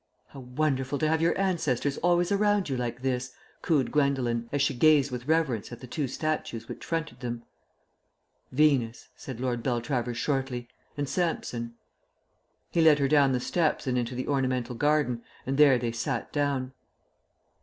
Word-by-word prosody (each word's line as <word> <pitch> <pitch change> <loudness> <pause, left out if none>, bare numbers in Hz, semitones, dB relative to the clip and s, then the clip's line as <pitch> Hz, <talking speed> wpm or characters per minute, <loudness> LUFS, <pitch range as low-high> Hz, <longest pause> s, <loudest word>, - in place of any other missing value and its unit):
"How 140 - -11
wonderful 135 +1 -1
to 155 - +1
have 160 +1 +1
your 170 +3 +2
ancestors 150 -8 0
always 175 +1 +2
around 205 -3 +2
you 135 - -1
like 125 0 -4
this!" 125 -1 -1 0.3
cooed 150 -6 +1
Gwendolen, 130 -5 +1
as 145 - 0
she 140 - +1
gazed 145 +1 +4
with 125 +1 -6
reverence 150 -10 +1
at 120 - -8
the - - -9
two 140 +3 -2
statues 130 -5 -3
which - - -8
fronted 165 -6 -3
them. 120 -2 -5 1.1
"Venus," 130 -5 +2
said 130 -6 -8
Lord 125 -2 -1
Beltravers 120 -1 -1
shortly, 130 -3 -2 0.3
"and 145 -1 -1
Samson." 130 -7 -2 1.0
He 170 - +2
led 160 -2 +6
her 140 -2 +2
down 140 -1 +4
the 125 - +1
steps 160 +5 0
and 130 -2 0
into 125 0 -1
the 130 - -4
ornamental 130 -3 0
garden, 145 -2 +1 0.2
and 135 +2 -2
there 140 -4 +7
they 120 -1 -2
sat 120 +1 -3
down. 140 -3 -1
135 Hz, 165 wpm, -28 LUFS, 125-150 Hz, 1.1 s, there